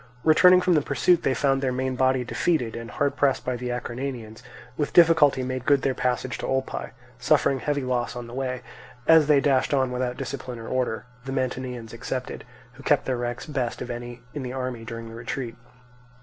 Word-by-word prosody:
Returning 180 +3 +7
from 180 - +3
the 155 - +4
pursuit, 175 +4 +2
they 130 - +1
found 135 -1 +2
their 130 -2 0
main 130 +1 -2
body 130 0 +2
defeated; 125 -2 0
and 115 0 -6
hard 140 +6 0
pressed 140 -2 +1
by 125 - -1
the 125 0 -4
Acarnanians, 120 -2 -5 0.3
with 145 +1 -2
difficulty 160 -6 +5
made 130 0 -3
good 140 0 +3
their 135 - +1
passage 125 0 -1
to - - -3
Olpae, 135 0 -2 0.3
suffering 135 0 +3
heavy 145 +1 -1
loss 125 -1 -1
on 120 -1 -6
the 120 - -11
way, 130 -1 -3 0.4
as 160 -2 +6
they 150 -2 +5
dashed 135 0 +2
on 130 -2 +1
without 125 0 -2
discipline 130 -2 -5
or 115 - -8
order, 125 -3 -1 0.2
the 135 - -4
Mantineans 125 -3 -3
excepted, 125 +2 -5 0.3
who 125 - -14
kept 145 - +2
their 130 -2 -1
ranks 120 0 -4
best 130 -6 -2
of 125 - -5
any 120 0 -7
in 145 - -4
the 125 -1 -5
army 130 -3 -4
during 115 0 -7
the 115 - -10
retreat. 120 +1 -5
130 Hz, 200 wpm, -25 LUFS, 120-140 Hz, 0.4 s, Returning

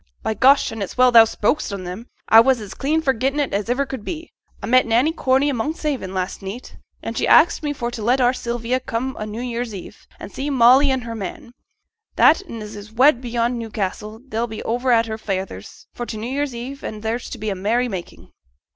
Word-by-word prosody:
'By - - 0
gosh, 270 +5 +4
an' 225 -1 -6
it's 200 - -5
well 250 0 +5
thou'st 225 -1 +7
spoke 220 +8 +1
on 195 -2 -5
'em; 185 +7 -7 0.2
a 225 - +8
was 260 0 +2
as 205 -3 -8
clean 310 +3 -1
forgettin' 265 +2 0
it 285 - -1
as 205 +3 -2
iver 265 +3 +1
could 260 -5 -7
be. 330 +5 -6 0.3
A - - -6
met 255 +1 +4
Nanny 240 +7 +3
Corney 270 -3 +1
i' - - +1
Monkshaven 280 - -3
last 185 +1 -3
neet, 195 +6 -8 0.3
and - - -5
she - - 0
axed 330 +1 +5
me 295 -2 -2
for 240 -4 -4
t' 235 - -6
let 245 +5 +2
our 250 0 +3
Sylvia 240 0 -2
come 255 +1 -3
o' 215 - -3
New 215 +3 -6
Year's 240 -3 -4
Eve, 185 - -11
an' - - -9
see 275 +2 -4
Molly 265 +1 +5
an' 260 -1 0
her 230 -1 -6
man, 220 +2 -7 0.6
that - - +5
'n 225 -2 -6
as 210 0 -9
is 205 +1 -10
wed 255 +2 +4
beyond 240 0 -1
Newcassel, 215 0 -5
they'll 230 0 -2
be 220 -1 -7
over 245 +3 0
at 230 -1 +4
her 220 0 -5
feyther's, 190 - -5
for 240 - -6
t' 220 - -5
New 230 +4 -5
Year, 285 +2 0 0.3
an' 215 -1 -6
there's 225 +2 -3
to - - -7
be 215 -1 -3
a - - -3
merry 225 +6 0
making.' 190 -6 -8
235 Hz, 225 wpm, -21 LUFS, 215-260 Hz, 0.6 s, a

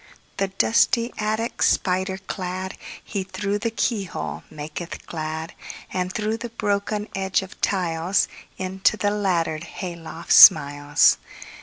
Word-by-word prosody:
The 195 - +1
dusty 230 +4 +2
attic 220 +2 -2
spider 190 0 +1
cladHe, 190 +1 -6
through 205 +1 -2
the 230 +2 -1
keyhole, 220 -4 -2
maketh 155 +3 -7
glad; 160 0 -5 0.4
And 180 0 -1
through 215 +2 -2
the 240 0 -6
broken 210 -1 -2
edge 195 0 0
of 190 - -13
tiles, 180 -1 +1 0.3
Into 190 +3 +1
the 205 -1 +1
laddered 175 -6 0
hay 180 -1 -6
loft 165 0 -3
smiles. 145 -1 +7
190 Hz, 120 wpm, -23 LUFS, 170-205 Hz, 0.4 s, smiles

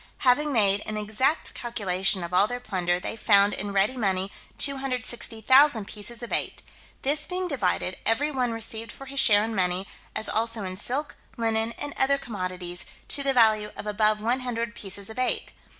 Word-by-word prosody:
Having 290 +4 +4
made 205 -5 +3
an 215 0 -3
exact 220 +9 0
calculation 195 -5 -1
of 170 +1 -6
all 190 +3 +5
their 245 +2 -4
plunder, 180 -6 -1
they 185 - -5
found 205 -2 +4
in 205 +1 -3
ready 200 +6 +2
money 195 -4 -1 0.3
260,000 255 -2 +2
pieces 230 +3 -6
of 240 - -5
eight: - - -2 0.4
this 295 +2 +2
being 365 0 -2
divided, 190 - -1
every 285 +7 +2
one 250 -4 0
received 225 0 -3
for 270 - -11
his 275 +1 -3
share 210 -5 +5
in 225 - -4
money, 185 -1 0 0.3
as 220 - +3
also 225 -1 -1
in 185 -1 -5
silk, 260 +9 -4 0.2
linen, 225 0 +1
and 290 0 -5
other 280 +1 +3
commodities, 185 -7 -4 0.3
to 285 - +2
the 275 -1 +2
value 220 -4 +4
of - - -6
above 215 0 +2
100 235 0 -2
pieces 200 -2 -4
of 220 +3 -7
eight. 255 - 0
225 Hz, 175 wpm, -26 LUFS, 200-255 Hz, 0.4 s, all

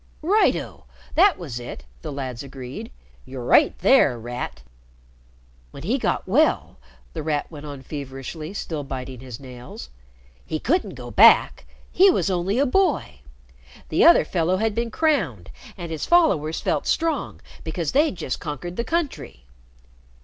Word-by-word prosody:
"Right, 410 +7 +4
oh! - - -7 0.3
That 375 +1 +5
was 140 -9 -6
it!" 120 - -8 0.2
the - - -6
lads 130 -4 -5
agreed. 130 -2 -8 0.3
"Yer 130 0 -8
right 290 - +4
there, 145 - +4
Rat!" 120 - -6 1.1
"When - - -11
he - - 0
got - - -1
well," 65 - +2 0.3
The - - -4
Rat 150 0 -2
went 150 -1 -9
on 140 -2 -8
feverishly, 140 +3 -7
still 155 -6 -4
biting 130 -2 -6
his 125 -3 -9
nails, 125 - -10 0.5
"he 155 - -3
couldn't 345 - 0
go - - -9
back. - - +5 0.2
He 390 +2 +6
was 275 - +1
only 185 +4 0
a 280 - +3
boy. 365 +3 +1 0.7
The - - +3
other - - +7
fellow 180 +1 0
had 220 +1 0
been 235 +2 -2
crowned, 215 - 0 0.3
and 170 -3 -6
his 160 - -4
followers 185 - +3
felt - - -1
strong 325 -5 -1 0.2
because 160 -1 -3
they'd 295 -4 +2
just 135 - -4
conquered 175 +4 -6
the 235 - 0
country. 290 - -3
155 Hz, 150 wpm, -23 LUFS, -, 1.1 s, other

